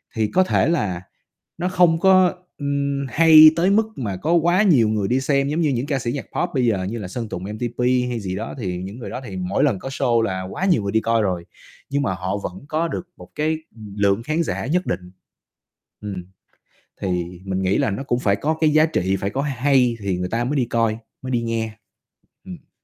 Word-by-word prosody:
thì 110 -1 +1
có 185 - +3
thể 185 - +1
là 100 - -1 0.6
nó 175 +2 -1
không 175 -3 +3
có, 185 -1 +5 0.2
ừm, 140 -1 -1
hay 155 +1 +8
tới 175 +3 +2
mức 220 +2 +3
mà 105 -7 -3
có 160 - 0
quá 175 +4 +3
nhiều 130 - +4
người 105 -2 0
đi 130 +4 +1
xem 140 0 +1
giống 160 +3 0
như 155 - +2
những 130 -1 -1
ca 140 -2 -1
sĩ 120 0 -2
nhạc 140 - -4
pop 175 - 0
bây 125 -2 +2
giờ 100 -5 +1
như 105 +5 -4
là 100 - -5
Sơn 115 +3 -5
Tùng 90 - -5
MTP 115 +4 -5 0.3
hay 120 - -2
gì 95 -3 -4
đó, 110 +4 -5
thì 90 -4 -3
những 95 +6 -7
người - - -7
đó 130 - -5
thì 100 -5 -7
mỗi 90 +2 0
lần 125 -10 +2
có 135 - -6
show 125 -4 +1
là 95 -4 -1
quá 190 - -2
nhiều 170 - +3
người 100 - -2
đi 110 +1 +2
coi 115 -1 +1
rồi, 90 -3 -2 0.4
nhưng 140 +1 0
mà 105 -9 0
họ 95 +2 -3
vẫn 95 +6 -7
có 160 +2 0
được 175 - -5
một - - -13
cái 155 +1 0 0.4
lượng 100 +2 +1
khán 155 +4 0
giả - - -3
nhất 180 +6 0
định. 90 0 -4 0.9
Ừm, 95 -4 -6 0.8
thì 90 -1 -3
mình 95 0 -2
nghĩ 95 +1 +2
là - - +1
nó 100 +7 -4
cũng 120 -3 -1
phải 100 -5 +2
có 155 +9 -1
cái 155 - +5
giá 155 0 +5
trị, 95 - 0
phải 100 - -2
có 135 - -2
hay 130 -3 +2
thì 95 -3 -2
người 90 0 -3
ta 115 +3 -1
mới 140 +4 -1
đi 130 -3 +2
coi, 115 -2 0 0.2
mới 130 0 -5
đi 120 - +1
nghe. 115 -1 -2 0.7
Ừm. - - -11
120 Hz, 235 wpm, -21 LUFS, 100-150 Hz, 0.9 s, hay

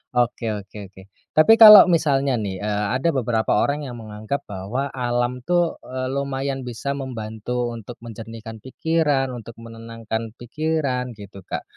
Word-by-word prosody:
oke 120 -1 0 0.2
oke 100 +2 -15
oke. 95 - -14 0.3
Tapi 155 +8 +7
kalau 210 -3 +12
misalnya 140 -5 +2
nih, 100 -2 -4
eee, 105 -1 -1
ada 165 +6 +1
beberapa 115 -3 0
orang 145 +1 0
yang 120 - -7
menganggap 110 +6 -5
bahwa 105 +8 -4
alam 120 0 -1
tuh, 175 0 +1
eee, 130 0 -4
lumayan 135 -1 -3
bisa 125 +4 -4
membantu 120 -2 -4
untuk 115 +1 -9
menjernihkan 115 0 -9
pikiran, 145 0 0
untuk 115 -1 -10
menenangkan 115 -1 -6
pikiran 130 -1 -2
gitu 100 -2 -11
Kak, - - -5
120 Hz, 145 wpm, -22 LUFS, 110-140 Hz, 0.3 s, kalau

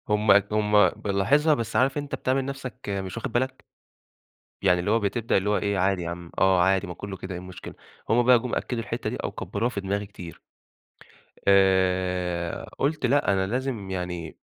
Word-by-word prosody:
هُم 105 0 +3 0.2
هُم 105 -2 +4
بالاحظها، 135 - +2
بس 115 -6 -3
عارف 135 +2 +2
أنت 145 -1 -3
بتعمل 130 +1 0
نفسك 135 -2 -6
مش 95 0 -4
واخد 120 +2 -4
بالك؟ 130 +2 -2 1.0
يعني 90 -2 +3
اللي 90 +4 -1
هو 115 - +3
بتبدأ 115 +2 0
اللي 95 +2 0
هو 105 - +2
إيه 100 -1 -1
عادي 95 0 +1
يا 85 - -4
عم 85 0 -8
آه 95 -2 +4
عادي 95 +2 +2
ما 90 - -5
كُلّه 95 +2 -7
كده 95 +1 -7
إيه 90 - -5
المشكلة؟ 90 0 -10 0.4
هُم 120 +3 +4
بقى 125 0 +6
جُم 125 +1 -3
أكدوا 120 -2 -2
الحِتّة - - -3
دي، - - -4
أو - - -4
كبّروها 115 +4 -2
في 105 -5 -4
دماغي 100 +2 -2
كتير. 90 -4 -11 1.1
آآ 90 -3 +2
قُلت 145 0 0
لأ 135 -4 +3
أنا 95 0 0
لازم 120 -3 -3
يعني 90 -3 -5
100 Hz, 185 wpm, -25 LUFS, 95-120 Hz, 1.1 s, بقى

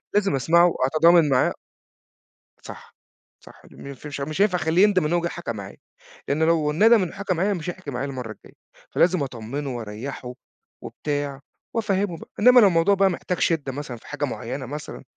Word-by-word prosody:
لازم 200 -8 +2
أسمَعه 170 +6 +4
وأتضامن 160 +2 +4
معاه. 130 -1 +2 1.1
صح، - - -12 0.5
صح، - - -16
مف 140 +1 -10
مش 140 -1 -6
مش 155 +6 -2
هينفع 190 -3 +3
أخلّيه 165 +4 +2
يندَم 190 -6 +3
إن 155 - 0
هو 175 - +2
جه 170 - -1
حكى 170 -7 -5
معايا، 100 -2 -9 0.5
لأن 150 +3 0
لو 160 -2 +2
ندَم 220 +5 +5
إنه 170 - -4
حكى 195 -1 -2
معايا، 195 +4 0
مش 175 -1 -5
هيحكي 175 -5 -7
معايا 125 +3 -3
المرّة 125 -5 -6
الجاية، - - -15 0.4
فلازم 175 -3 +2
أطمّنه 130 +2 -5
وأريّحه 120 +3 -7 0.5
وبتاع، 145 -2 -4 0.4
وأفهّمه 200 -5 -1
بقى، - - -13
إنما 250 +3 +7
لو 205 - +7
الموضوع 180 +3 +3
بقى 195 0 +3
محتاج 180 0 -3
شِدّة 150 -5 0
مثلًا 130 -3 -6
في - - -18
حاجة 145 0 -3
معيّنة 130 0 -5
مثلًا، 150 +3 -8
155 Hz, 180 wpm, -23 LUFS, 135-185 Hz, 1.1 s, إنما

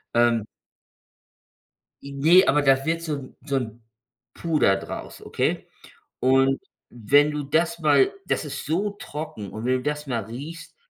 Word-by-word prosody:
ähm 120 -2 +3 1.6
I 140 - -9
ne, 165 +7 +6
aber 145 +1 +3
da 135 -1 +3
wird 165 +1 -1
so 160 -2 -2
'n 135 -2 -10
so 140 -2 -1
'n 120 -2 -4 0.5
Puder 155 - +2
draus, 95 - -8
ok? - - -2 0.5
Und 135 +1 +3 0.3
wenn 140 +6 +3
du 150 -1 -3
das 165 +4 0
mal 385 - +4
das - - -1
ist 140 -1 -6
so 185 +7 0
trocken 150 - -7
und 110 +2 -6
wenn 130 - +2
du 125 - -7
das 150 0 -3
mal 120 -4 -2
riechst 145 +10 -9
140 Hz, 155 wpm, -24 LUFS, 125-155 Hz, 1.6 s, ne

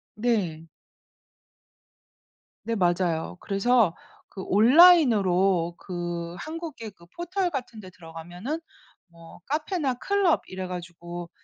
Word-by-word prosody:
네. 200 -9 -1 2.0
네 230 - -2
맞아요. 175 -3 0
그래서 200 -2 +2 0.3
그 190 - -8
온라인으로 205 - +5
그 175 -1 -5
한국의 315 -8 -7
그 170 -3 -20
포털 360 +2 -2
같은 250 -7 -6
데 185 - -10
들어가면은 175 - -7 0.5
뭐 170 -1 -15
카페나 300 -2 -1
클럽 395 +3 +1
이래 185 0 -6
가지고 175 -1 -7
195 Hz, 210 characters per minute, -26 LUFS, 175-270 Hz, 2.0 s, 온라인으로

